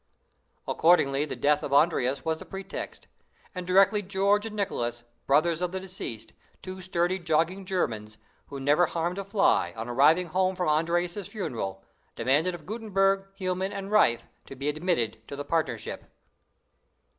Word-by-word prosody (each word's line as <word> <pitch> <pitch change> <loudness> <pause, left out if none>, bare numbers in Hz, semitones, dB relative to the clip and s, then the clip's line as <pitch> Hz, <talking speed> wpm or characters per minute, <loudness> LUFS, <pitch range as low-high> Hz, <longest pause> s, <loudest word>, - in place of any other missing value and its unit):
Accordingly 145 -4 +3
the - - -5
death 150 0 +2
of - - -5
Andreas 140 -3 +2
was 160 0 0
the - - -9
pretext; 195 0 -7 0.5
and 180 -1 -6
directly 195 +3 +5
George 200 +2 +1
and 215 - -8
Nicholas, 120 - -2 0.2
brothers 155 +4 +3
of 180 -1 -1
the 190 - -2
deceased, 185 - -7 0.3
two 185 0 -7
sturdy 180 0 0
jogging 170 +3 0
Germans, 110 - -2 0.3
who 140 - -7
never 150 +6 +3
harmed 170 +4 -2
a - - -3
fly, 195 - +2
on 115 +1 -4
arriving 155 +8 +4
home 185 +2 +1
from 180 -3 0
Andreas's 175 +5 0
funeral, 115 - -4 0.3
demanded 145 +9 +1
of 160 -3 -12
Gutenberg, 195 -2 +1
Hielman, 185 +1 -2
and 200 0 -6
Riffe 120 - +4 0.2
to 135 - -9
be 140 +3 -2
admitted 150 -9 -1
to 140 - -6
the 145 0 -5
partnership! 155 -9 -3
175 Hz, 155 wpm, -27 LUFS, 140-190 Hz, 0.5 s, directly